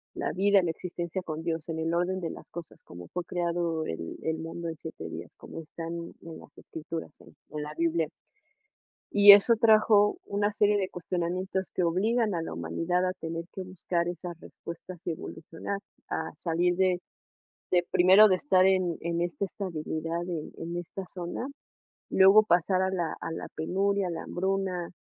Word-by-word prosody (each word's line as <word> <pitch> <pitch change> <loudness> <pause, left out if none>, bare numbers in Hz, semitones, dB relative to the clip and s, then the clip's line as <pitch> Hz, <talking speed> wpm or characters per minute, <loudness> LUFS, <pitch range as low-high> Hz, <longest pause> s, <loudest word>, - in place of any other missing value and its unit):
la - - -2
vida, 200 +3 +4
la 170 - +1
existencia 175 +1 -4
con 160 -1 -5
Dios, 165 -1 -3
en 160 0 -3
el 165 +1 -1
orden 180 +2 0
de 170 -3 -3
las - - -11
cosas, 170 -1 -9
como 90 0 -11
fue 180 - -3
creado 170 -2 -1
el 80 0 -5
el 160 0 -1
mundo 165 +1 -5
en 160 - -6
7 160 - -7
días, - - -8
como - - -9
están 165 +1 -7 0.3
en 165 -1 -9
las - - -16
escrituras 160 -1 -7
en - - -17 0.2
en 150 -1 -4
la 150 0 -6
Biblia. 165 -1 +1 1.1
Y 205 0 +11
eso 205 +4 +8
trajo 215 -2 +5
una 205 +1 0
serie 205 0 +3
de 190 -2 -1
cuestionamientos 180 +2 -2
que 180 - 0
obligan 210 +5 +1
a 165 - -1
la - - -5
humanidad 165 - -1
a 185 - -1
tener 165 -2 -5
que 190 - -5
buscar 180 -1 -2
esas 175 -1 -6
respuestas 170 +1 -10
y - - +1
evolucionar, 165 +4 -6 0.3
a - - -2
salir 175 +1 +1
de 185 -1 +2 0.7
de 175 -1 +3
primero, 190 +4 +8
de 185 - +5
estar 185 -3 +3
en 185 -3 +2 0.2
esta 175 +3 -1
estabilidad, 165 -3 -4
en 165 -4 -4
en 170 +1 -5
esta 175 +3 -6
zona, 175 +6 -5 0.7
luego 195 +3 +7
pasar 185 -1 +2
a 190 - +1
la 175 -4 -2
a - - -4
la 165 - -5
penuria, 195 +4 0
a - - -3
la 165 - -5
hambruna, 190 -1 -1
175 Hz, 175 wpm, -28 LUFS, 165-190 Hz, 1.1 s, Y